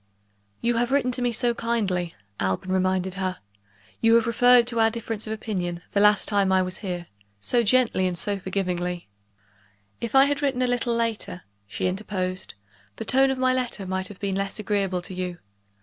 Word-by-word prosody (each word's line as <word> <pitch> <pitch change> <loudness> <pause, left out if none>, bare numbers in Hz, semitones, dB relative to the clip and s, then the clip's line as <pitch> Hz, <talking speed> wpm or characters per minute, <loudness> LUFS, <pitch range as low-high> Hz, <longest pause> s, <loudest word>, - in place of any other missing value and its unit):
"You 235 0 +1
have 240 +2 +1
written 270 -2 +2
to 250 - -2
me 245 -1 +1
so 240 +1 +1
kindly," 200 -8 -1 0.2
Alban 95 - -1
reminded 185 0 +1
her; 185 -1 -2 0.6
"you 225 0 +5
have 230 -1 +4
referred 245 +1 +5
to 235 -1 -1
our 225 0 +5
difference 225 -1 -5
of 215 - -2
opinion, 180 -6 -3
the 200 - +1
last 210 0 +5
time 200 -2 +2
I 190 0 +4
was 185 +1 -5
here, 180 -4 -4 0.3
so 240 - +2
gently 230 -4 +3
and 180 -1 -3
so 200 +3 -2
forgivingly 180 -2 -2 0.5
" 100 0 -36
"If 235 +2 -3
I 270 0 +8
had 285 0 0
written 270 -3 +1
a - - +3
little 245 -1 0
later," 230 -5 -2 0.2
she 100 - -3
interposed, 185 - -3 0.4
"the - - -6
tone 270 +1 +4
of 265 - -1
my 255 0 +2
letter 245 -6 -2
might 190 0 -2
have 200 -1 -11
been 200 -1 -2
less 195 +1 -2
agreeable 195 -4 -1
to 185 - -7
you. 180 -1 -4
205 Hz, 195 wpm, -25 LUFS, 185-235 Hz, 0.6 s, I